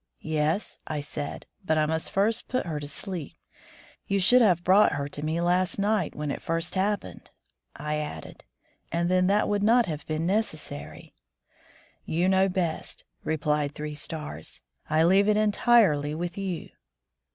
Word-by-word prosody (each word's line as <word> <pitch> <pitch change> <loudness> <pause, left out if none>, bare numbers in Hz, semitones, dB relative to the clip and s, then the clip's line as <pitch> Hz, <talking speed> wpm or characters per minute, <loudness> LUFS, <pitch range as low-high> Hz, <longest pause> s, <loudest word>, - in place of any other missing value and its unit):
"Yes," 155 +5 -1
I 155 -1 -2
said, 145 0 -5 0.2
"but 160 -3 +1
I 155 - +3
must 160 +1 -1
first 215 +4 +1
put 255 - -1
her 155 -4 -3
to 145 - -6
sleep. 165 +2 -5 0.7
You 200 0 +1
should 245 +7 +6
have 180 -6 +4
brought 195 +4 +5
her 140 -1 -2
to 145 +1 -7
me 160 +2 -1
last 180 +1 +1
night, 205 -3 0
when 150 -1 -3
it - - -5
first 165 +1 -1
happened, 190 - -2 0.3
" - - -58
I 150 +1 -3
added, 150 - -7 0.5
"and 170 +1 0
then 185 0 +3
that 205 +2 +3
would 205 -1 0
not 235 +3 +4
have 155 -3 -5
been 155 +1 -1
necessary." 155 - -3 0.9
"You 170 +3 0
know 190 0 +4
best," 175 -3 -2 0.2
replied 150 -2 0
Three 150 0 -5
Stars, 150 - -6 0.3
"I 155 +1 +3
leave 190 +4 +4
it 210 - +3
entirely 205 -9 +3
with 175 +1 -4
you." 190 -4 -4
170 Hz, 165 wpm, -27 LUFS, 150-195 Hz, 0.9 s, should